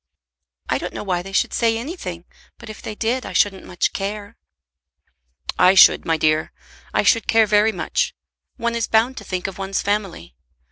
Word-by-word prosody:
"I - - 0
don't - - -6
know - - -5
why 180 -3 -1
they 195 +2 -10
should 195 - 0
say 230 -1 +1
anything, 225 - -6 0.3
but 235 -2 -10
if 215 - -12
they 215 - -6
did 240 +4 -1
I - - -7
shouldn't 195 -2 +1
much 175 - -1
care." 205 +2 -5 1.2
"I 180 +1 +6
should, 185 - +7
my 165 -1 +1
dear. 155 0 +1 0.4
I - - +1
should 230 -3 +3
care 225 -1 +4
very 210 +1 +3
much. 185 - -2 0.4
One 235 0 -1
is 230 -1 -1
bound 230 +4 +2
to - - -7
think 185 -1 -4
of 195 0 -5
one's 195 0 -2
family. 195 - -3
205 Hz, 185 wpm, -21 LUFS, 185-225 Hz, 1.2 s, should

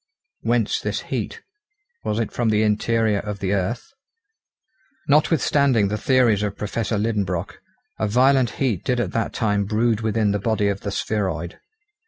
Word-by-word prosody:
Whence - - +1
this - - -3
heat? 455 - -4 0.6
Was 105 - -1
it 115 -2 -1
from 120 -2 0
the 110 0 +2
interior 110 0 +1
of 105 0 -5
the 95 0 -1
earth? 100 +5 -2 1.2
Notwithstanding 140 - +3
the 105 - -1
theories 120 -6 +3
of 105 -1 -3
Professor 110 +1 -2
Liedenbrock, 100 -5 -2 0.4
a 110 - +1
violent 130 +3 +4
heat 120 -10 0
did 125 -2 0
at 120 - -1
that 115 - -1
time 105 -2 0
brood 110 +1 +1
within 110 -1 +1
the 105 - 0
body 105 -1 +1
of 100 0 -3
the 100 - -4
spheroid. 95 -5 -2
110 Hz, 155 wpm, -22 LUFS, 100-120 Hz, 1.2 s, violent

